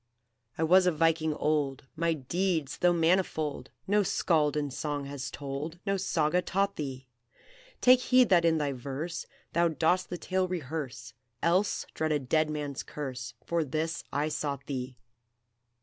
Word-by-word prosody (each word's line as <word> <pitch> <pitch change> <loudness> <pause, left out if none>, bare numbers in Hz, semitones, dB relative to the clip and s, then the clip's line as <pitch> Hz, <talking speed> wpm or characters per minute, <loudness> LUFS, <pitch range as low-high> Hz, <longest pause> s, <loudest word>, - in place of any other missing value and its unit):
"I 160 - 0
was 180 +3 +5
a - - +5
Viking 160 -1 +2
old! 145 -4 0
My 170 +1 +1
deeds, 160 +1 -1
though 180 - +5
manifold, 160 -5 +1 0.2
No 205 +2 +3
Skald 155 -6 +2
in 145 -2 -1
song 145 +1 -3
has 140 -1 -5
told, 145 +4 -5
No 195 -1 +1
Saga 180 -3 +1
taught 195 +2 0
thee! 135 -3 -5 0.8
Take 255 0 +7
heed 255 -1 +4
that 175 -3 +5
in 165 -1 +3
thy 145 -2 0
verse 140 +6 -5 0.3
Thou 170 0 +4
dost 170 +3 +1
the 175 - -4
tale 185 +1 0
rehearse, 140 -8 -5 0.3
Else 185 +5 +2
dread 155 0 -1
a 150 - +3
dead 155 +3 +1
man's 145 -3 -3
curse; 130 -5 -6
For 170 -1 +1
this 160 +3 -2
I 145 +2 0
sought 140 -3 -3
thee. 130 -2 -4
155 Hz, 155 wpm, -29 LUFS, 140-175 Hz, 0.8 s, Take